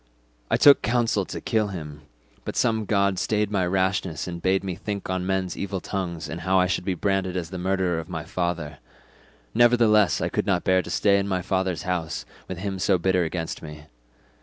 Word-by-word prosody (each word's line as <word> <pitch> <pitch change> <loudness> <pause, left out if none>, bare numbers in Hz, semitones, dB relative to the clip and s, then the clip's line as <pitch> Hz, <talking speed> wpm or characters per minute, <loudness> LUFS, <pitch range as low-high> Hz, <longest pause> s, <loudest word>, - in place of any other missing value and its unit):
I - - +3
took 145 -1 +7
counsel 115 -4 +1
to - - -6
kill 110 -2 0
him, 75 -6 -7 0.4
but - - -5
some 110 -2 +1
god 100 -2 +1
stayed 105 0 0
my 95 -3 +1
rashness 95 -3 0
and 85 -1 -6
bade 95 +2 +1
me 95 -2 -3
think 100 +1 -5
on 95 0 -2
men's 95 -2 -1
evil 100 -1 -3
tongues 85 -3 -4
and 85 +1 -6
how 95 +2 +2
I 90 - +4
should 90 0 -1
be 95 -2 0
branded 95 -1 0
as 85 -1 -4
the 90 - -5
murderer 95 -2 0
of 80 - -8
my 80 -3 -4
father; 80 -4 -3 0.7
nevertheless 115 -4 +4
I - - 0
could - - -2
not 90 -3 +1
bear 95 0 +3
to - - -10
stay 100 -1 +3
in 100 - -2
my 90 -2 -1
father's 95 -4 -1
house 90 -3 -3 0.2
with 95 - -5
him 95 +1 -4
so 95 0 +3
bitter 90 0 +2
against 80 0 -4
me. 75 -1 -9
95 Hz, 205 wpm, -25 LUFS, 90-100 Hz, 0.7 s, took